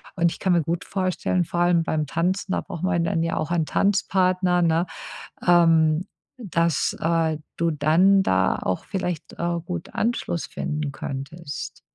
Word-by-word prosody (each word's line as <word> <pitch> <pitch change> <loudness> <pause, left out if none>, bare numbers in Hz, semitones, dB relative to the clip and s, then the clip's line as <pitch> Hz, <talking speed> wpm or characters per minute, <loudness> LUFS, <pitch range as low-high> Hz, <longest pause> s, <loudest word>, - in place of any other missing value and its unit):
Und 170 -3 +2
ich - - -8
kann 190 -2 +2
mir 170 - +3
gut 165 +3 -3
vorstellen, 185 -1 0
vor 175 +1 -4
allem 175 -1 +3
beim 155 -1 -1
Tanzen, 180 +6 -1
da - - 0
braucht 170 - -8
man 170 -2 +1
dann 165 0 0
ja 165 - -1
auch 155 - -2
einen 170 -2 +1
Tanzpartner, 185 -2 +2
ne, 165 0 +2 0.6
ähm, 165 -2 +4 0.3
dass, 170 - 0
äh, 165 -1 +1 0.2
du 170 0 +1
dann 175 +6 +4
da 95 - +2
auch 95 - -2
vielleicht, 180 -4 -4
äh, 170 0 -1
gut 175 0 -6
Anschluss 215 -7 -1
finden 150 -1 -3
könntest. 140 +3 -6
170 Hz, 160 wpm, -24 LUFS, 160-180 Hz, 0.6 s, ähm